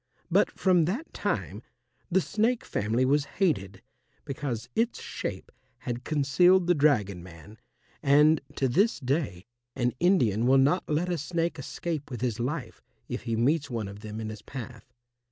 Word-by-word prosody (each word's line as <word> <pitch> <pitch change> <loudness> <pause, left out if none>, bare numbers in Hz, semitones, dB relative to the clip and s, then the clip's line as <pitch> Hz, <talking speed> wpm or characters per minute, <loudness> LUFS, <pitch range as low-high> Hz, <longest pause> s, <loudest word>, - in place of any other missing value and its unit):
But - - +4
from 180 -4 +4
that 230 - -3
time - - -2 0.5
the 190 +1 +3
snake 225 +6 0
family 115 +5 0
was 140 +2 +2
hated 100 - 0 0.4
because 135 -5 -4
its 230 +2 0
shape 95 -2 -6 0.3
had 120 0 -5
concealed 170 +6 +4
the 175 - +4
dragon 120 - +2
man, 90 +5 -13 0.4
and 150 +2 +5
to 135 - +1
this 200 - +2
day 130 - -2 0.3
an 125 -2 0
Indian 120 - +3
will 135 +1 +6
not 145 +7 +2
let 160 +4 0
a 175 -2 -1
snake 165 +2 -2
escape 150 +2 -4
with 125 -3 -6
his 120 -3 -1
life 135 +4 -4 0.3
if - - -5
he 115 -2 -1
meets 145 +6 +1
one 115 -5 -3
of 100 +1 -9
them 105 +1 -7
in 110 -1 -4
his 110 -1 -8
path. 125 -1 -9
135 Hz, 160 wpm, -28 LUFS, 115-170 Hz, 0.5 s, will